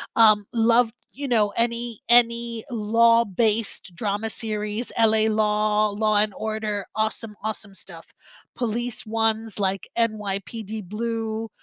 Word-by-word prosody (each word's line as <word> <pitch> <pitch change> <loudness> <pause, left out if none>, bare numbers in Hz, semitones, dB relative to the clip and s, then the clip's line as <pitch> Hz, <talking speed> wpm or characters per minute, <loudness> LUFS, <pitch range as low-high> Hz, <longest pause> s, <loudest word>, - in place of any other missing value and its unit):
um, 215 -3 +5
love, 230 0 +3 0.2
you 280 +1 -5
know, 215 -4 +3
any 235 -1 -1
any 235 -1 +3
law-based 225 -3 +2
drama 210 +1 -1
series, 215 +1 -3
LA 220 -1 +4
Law, 210 0 +2
Law& 210 0 +2
Order, 215 -2 -3
awesome, 220 0 -2
awesome 215 -2 -3
stuff, 170 -3 -7 0.5
police 240 0 -2
ones, 225 -1 0
like, 190 -2 -1
NYPD 215 -1 -2
Blue 225 0 -3
220 Hz, 110 wpm, -24 LUFS, 210-230 Hz, 0.5 s, um